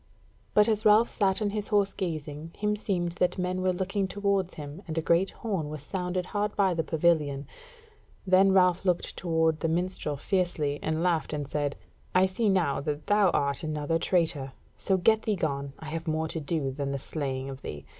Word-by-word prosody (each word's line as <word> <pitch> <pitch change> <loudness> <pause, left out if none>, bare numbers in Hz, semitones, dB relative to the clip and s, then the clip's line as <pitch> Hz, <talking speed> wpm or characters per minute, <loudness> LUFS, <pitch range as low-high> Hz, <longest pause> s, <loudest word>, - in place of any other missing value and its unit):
But 210 0 +6
as 215 -1 +1
Ralph 215 +2 +6
sat 195 -1 +1
on 205 - 0
his 210 0 -2
horse 200 -2 +2
gazing, 155 -2 -5
himseemed 210 -4 -1
that 180 0 +2
men 185 0 -1
were 185 0 +2
looking 190 +2 -1
towards 200 -1 0
him, 150 +3 -8
and 160 -1 -4
a - - +4
great 170 +4 +3
horn 190 -10 -3
was 150 -2 -7
sounded 180 +1 -2
hard 205 +1 -2
by 195 -2 +3
the 165 -1 0
pavilion; 150 -4 +1 0.8
then 190 +1 +5
Ralph 180 -2 +4
looked 180 -2 0
toward 160 -2 +1
the 165 - 0
minstrel 170 -3 -1
fiercely, 155 -4 0
and 160 +1 -1
laughed 165 -5 +1
and 145 -2 -3
said: 145 0 -1 0.4
"I 185 +1 +6
see 205 +4 0
now 175 -9 +1
that 150 +1 -3
thou 205 -2 +4
art 140 -3 0
another 155 0 -1
traitor: 160 -7 0 0.2
so 190 - 0
get 220 +4 +3
thee 215 -2 0
gone; 140 -5 -2
I 160 - -8
have 165 +1 -5
more 160 0 0
to 160 - -3
do 145 -2 -2
than 140 +1 -3
the 140 - -2
slaying 135 -2 -4
of 135 -1 -7
thee." 75 -1 -7
170 Hz, 195 wpm, -28 LUFS, 150-190 Hz, 0.8 s, But